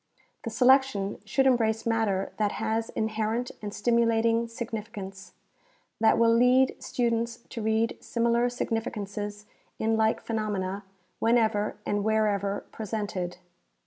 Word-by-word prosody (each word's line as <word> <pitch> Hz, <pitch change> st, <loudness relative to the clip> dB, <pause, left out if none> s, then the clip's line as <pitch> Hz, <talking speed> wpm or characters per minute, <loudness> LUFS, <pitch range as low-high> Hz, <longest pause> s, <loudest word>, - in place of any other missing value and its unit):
The -, -, -1 dB
selection 255 Hz, -6 st, +3 dB
should 270 Hz, 0 st, +1 dB
embrace 225 Hz, -4 st, +2 dB
matter 220 Hz, -4 st, 0 dB
that 210 Hz, -1 st, +1 dB
has 225 Hz, +1 st, -1 dB
inherent 220 Hz, +2 st, -1 dB
and 210 Hz, -1 st, -5 dB
stimulating 230 Hz, +1 st, +2 dB
significance, 215 Hz, -5 st, -7 dB, 0.7 s
that 220 Hz, 0 st, +4 dB
will 230 Hz, 0 st, +5 dB
lead 250 Hz, +2 st, +4 dB
students 235 Hz, -1 st, -1 dB
to 235 Hz, -, -5 dB
read 220 Hz, +1 st, +1 dB
similar 235 Hz, +1 st, +1 dB
significances 210 Hz, -3 st, -4 dB, 0.3 s
in 225 Hz, 0 st, +1 dB
like 220 Hz, 0 st, +2 dB
phenomena 205 Hz, -3 st, -3 dB, 0.3 s
whenever 220 Hz, -3 st, +2 dB
and 205 Hz, 0 st, 0 dB
wherever 205 Hz, -2 st, +1 dB
pre 220 Hz, -, -6 dB
sented. 190 Hz, -4 st, -3 dB
220 Hz, 115 wpm, -27 LUFS, 205-230 Hz, 0.7 s, will